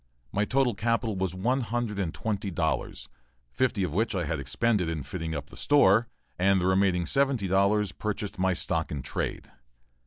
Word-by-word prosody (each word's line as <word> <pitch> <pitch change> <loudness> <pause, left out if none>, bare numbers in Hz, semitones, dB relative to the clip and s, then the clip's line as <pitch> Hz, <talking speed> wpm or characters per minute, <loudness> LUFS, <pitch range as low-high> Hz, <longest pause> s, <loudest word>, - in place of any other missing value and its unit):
My 105 +2 +1
total 130 0 +2
capital 115 +1 0
was 95 -1 -2
one 125 +8 +1
hundred 115 -2 -2
and 90 -5 -1
twenty 105 0 -3
dollars, 80 -3 -2 0.4
fifty 115 - 0
of 90 - -2
which 110 +3 0
I 90 - 0
had 75 0 -2
expended 90 - 0
in 80 -4 -3
fitting 80 +2 -4
up 75 - -6
the - - -11
store, 115 -6 +4 0.3
and 95 +1 +4
the 90 - -1
remaining 95 -2 +2
seventy 135 - +1
dollars 100 +1 +2
purchased 105 -2 -4
my 95 0 +2
stock 85 -2 -1
in 70 -4 -4
trade. - - -4
100 Hz, 180 wpm, -28 LUFS, 90-115 Hz, 0.4 s, store